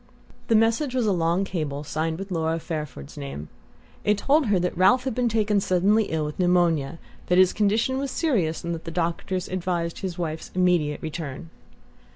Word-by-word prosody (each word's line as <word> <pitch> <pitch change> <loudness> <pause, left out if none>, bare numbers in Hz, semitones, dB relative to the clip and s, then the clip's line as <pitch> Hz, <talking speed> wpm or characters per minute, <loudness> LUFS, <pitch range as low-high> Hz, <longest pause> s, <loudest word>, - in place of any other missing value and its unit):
The 225 - +3
message 230 +5 +2
was 250 -3 +1
a 210 - +2
long 170 +1 +1
cable 150 -6 -3
signed 160 +2 -2
with 195 +1 -7
Laura 165 -1 0
Fairford's 150 - -6
name. 70 +2 -6 0.5
It 210 0 +2
told 280 +5 +2
her 205 -2 +3
that 180 0 -1
Ralph 240 +9 +4
had 260 -2 -2
been 245 0 +1
taken 210 -2 +2
suddenly 195 +4 +2
ill 160 -3 -2
with 150 +3 -6
pneumonia, 170 -4 +2 0.3
that 180 - +3
his 185 -1 +5
condition 220 +5 +1
was 275 0 -2
serious 210 - 0
and 170 0 -2
that 165 - -7
the - - -4
doctors 175 +2 -2
advised 175 -2 -2
his 185 -3 -4
wife's 160 -2 -4
immediate 175 -5 +1
return. 160 -1 -6
180 Hz, 185 wpm, -25 LUFS, 160-210 Hz, 0.5 s, his